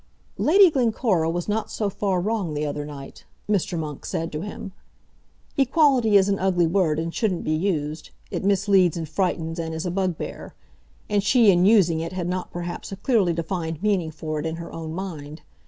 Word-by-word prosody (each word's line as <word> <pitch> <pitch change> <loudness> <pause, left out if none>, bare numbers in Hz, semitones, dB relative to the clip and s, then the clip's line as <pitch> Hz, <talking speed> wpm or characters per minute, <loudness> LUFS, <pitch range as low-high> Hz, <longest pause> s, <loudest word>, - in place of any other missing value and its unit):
"Lady 375 +2 +6
Glencora 225 - +1
was 175 +1 -3
not 215 +1 -1
so 210 - -2
far 200 -1 -1
wrong 195 -5 -2
the 150 +1 -1
other 145 0 -3
night," 140 -2 -10 0.2
Mr. 195 -4 0
Monk 150 -3 -5
said 165 +1 -3
to 150 - -4
him. 200 0 -7 0.9
"Equality 265 -6 +4
is 195 0 +4
an 195 -1 0
ugly 185 -2 +2
word 165 -3 +1
and 165 +1 -3
shouldn't 195 -6 -1
be - - -2
used. 155 -3 -2 0.2
It - - -3
misleads, 195 -3 +3
and 165 -2 -4
frightens, 165 -1 -2
and 160 -1 -3
is 160 - -4
a 180 - -1
bugbear. 185 -2 -3 0.5
And 205 -1 +1
she, 220 0 +5
in 180 0 +3
using 185 -7 +4
it, 165 +2 -4
had 180 -2 -3
not 180 0 -3
perhaps 175 +2 -6
a - - -4
clearly 200 -6 +2
defined 165 0 -4
meaning 195 -6 +1
for 155 -1 -4
it 150 - -4
in 160 - -3
her 170 0 -8
own 160 -1 -6
mind. 160 -5 -7
180 Hz, 190 wpm, -24 LUFS, 160-200 Hz, 0.9 s, Lady